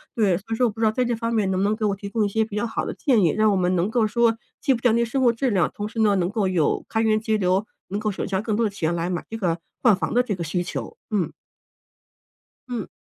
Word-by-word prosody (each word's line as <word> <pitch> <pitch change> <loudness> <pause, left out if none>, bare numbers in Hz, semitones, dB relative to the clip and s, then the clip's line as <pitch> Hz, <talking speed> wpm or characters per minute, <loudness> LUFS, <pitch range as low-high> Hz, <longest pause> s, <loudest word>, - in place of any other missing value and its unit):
对， 200 -6 +3
所 195 - -11
以 - - +1
说 250 - +3
我 - - -2
不 225 - -13
知 - - +4
道 215 - +4
在 250 +2 0
这 240 -1 0
方 230 +1 -2
面 205 -4 +1
能 185 - 0
不 - - +1
能 210 +2 +2
给 215 - -1
我 200 -1 +1
提 200 +1 -7
供 220 -1 +1
一 - - -1
些 220 +2 +1
比 215 -2 -8
较 235 - 0
好 220 - -3
的 - - -3
建 245 -7 +2
议？ 165 - +4
让 215 +4 +3
我 - - +2
们 180 0 +1
能 180 +5 +1
够 230 -2 +2
说 230 0 +2 0.2
既 270 - +3
不 235 - -4
降 245 -3 +4
低 235 0 +2
生 265 +3 -1
活 240 - +6
质 255 +3 0
量， 185 -3 +2
同 205 0 -4
时 225 - -6
呢， 205 -2 +4
能 175 0 +1
够 210 -3 0
有 170 -5 +1
开 225 - 0
源 215 -1 +3
节 220 -1 +1
流， 190 +2 +1 0.2
能 200 +2 -2
够 215 -1 0
省 - - -4
下 195 0 -1
更 215 -2 -1
多 230 - +2
的 - - +1
钱 170 -4 -1
来 170 +1 -2
买 175 - -2
这 225 - -5
个 175 -5 -1 0.2
换 230 -6 +5
房 180 +1 -3
的 245 - +4
这 210 -6 -2
个 170 - -4
需 170 +3 -1
求， - - -6
嗯。 200 -6 0 1.4
嗯。 235 -5 -4
215 Hz, 330 characters per minute, -23 LUFS, 190-230 Hz, 1.4 s, 活